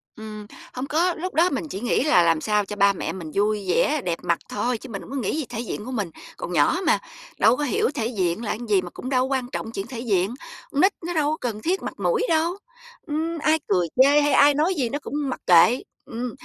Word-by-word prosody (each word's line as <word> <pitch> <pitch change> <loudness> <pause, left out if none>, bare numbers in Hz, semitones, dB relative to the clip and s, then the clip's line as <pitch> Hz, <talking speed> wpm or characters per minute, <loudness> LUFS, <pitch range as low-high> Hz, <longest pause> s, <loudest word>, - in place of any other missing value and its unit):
Ừm, 215 -1 -8 0.3
hông 255 +2 -4
có, 345 +3 +2
lúc 365 +3 -5
đó 345 +3 +4
mình 295 +3 -3
chỉ 195 - -5
nghĩ 245 +2 +1
là 180 - +5
làm 165 -2 +2
sao 210 -1 +1
cho 210 - -6
ba 200 -1 +4
mẹ - - -4
mình 165 -5 -7
vui 205 0 0
vẻ, 295 +10 +2
đẹp 170 -1 -1
mặt 170 - +1
thôi 235 +3 -1
chứ 260 - -11
mình 195 -3 -5
hổng - - -12
có - - -4
nghĩ 255 +5 -1
gì 305 - -2
thể 235 -2 -5
diện 225 -2 -5
của 260 - -6
mình, 205 -8 -2 0.3
còn 180 - -5
nhỏ 170 - +3
mà, - - +4 0.4
đâu 240 - +5
có 295 - -2
hiểu 255 - +1
thể 230 -5 -1
diện 190 -2 -1
là - - -2
cái - - -3
gì, 195 -3 +4
mà 180 - -7
cũng 255 - -7
đâu 260 0 +1
có - - 0
quan 250 -2 -2
trọng 225 - -4
chuyện 195 0 -5
thể 240 -2 -7
diện. 205 -2 0 0.4
Con 285 - +1
nít 385 +2 +5 0.2
nó 350 - -2
đâu 300 -2 +1
có 315 - -2
cần 215 -3 -4
thiết 370 +3 -1
mặt - - -4
mũi 480 -2 +1
đâu, 335 +3 +1 0.5
ừm, 320 +3 -2
ai 315 +1 +2
cười 180 -4 +2 0.2
chê 290 +2 +5
hay 290 -1 +2
ai 285 +2 +6
nói 315 +6 +1
gì 260 -7 0
nó 290 +5 -3
cũng - - -9 0.2
mặc - - -4
kệ, 180 +8 +6 0.2
ừm, 240 +1 -4
245 Hz, 265 wpm, -24 LUFS, 205-295 Hz, 0.5 s, ai